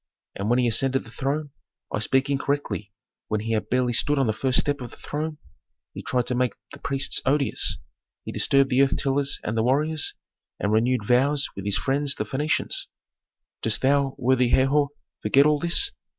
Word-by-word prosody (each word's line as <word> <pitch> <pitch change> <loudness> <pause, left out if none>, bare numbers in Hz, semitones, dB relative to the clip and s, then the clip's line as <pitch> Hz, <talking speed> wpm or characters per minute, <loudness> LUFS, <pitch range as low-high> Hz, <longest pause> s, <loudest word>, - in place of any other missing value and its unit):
And 100 +2 -3
when 120 - +3
he 125 - +2
ascended 130 +3 +2
the 115 - -13
throne 145 +3 -3 0.4
I - - 0
speak 130 +5 +1
incorrectly, 140 -7 -2 0.4
when 105 -1 -1
he 115 +1 -4
had 110 -1 -1
barely 125 -1 +1
stood 145 +5 +1
on 135 - +2
the 110 - +1
first 130 +3 +1
step 145 -1 -1
of 120 - -6
the - - -15
throne, 150 +1 -4 0.6
he - - -7
tried 125 -2 -1
to 125 - -1
make 125 -3 0 0.2
the - - -11
priests 135 0 0
odious; 140 +1 +1 0.5
he - - -5
disturbed 135 0 +2
the 130 +2 +4
earth 135 0 +2
tillers 140 0 0
and 105 - -3
the 110 - +1
warriors, 145 +6 +1 0.4
and 100 - -1
renewed 115 +1 +1
vows 135 +5 +2
with 100 - -7
his 100 -1 +1
friends 140 +1 0
the - - -2
Phœnicians. 145 +8 -1 0.7
"Dost 110 -1 0
thou, 140 0 +2
worthy 130 -1 +2
Herhor, 140 +3 +3 0.3
forget 140 +1 +4
all 150 -1 +3
this? 170 - +3
135 Hz, 190 wpm, -24 LUFS, 120-145 Hz, 0.7 s, the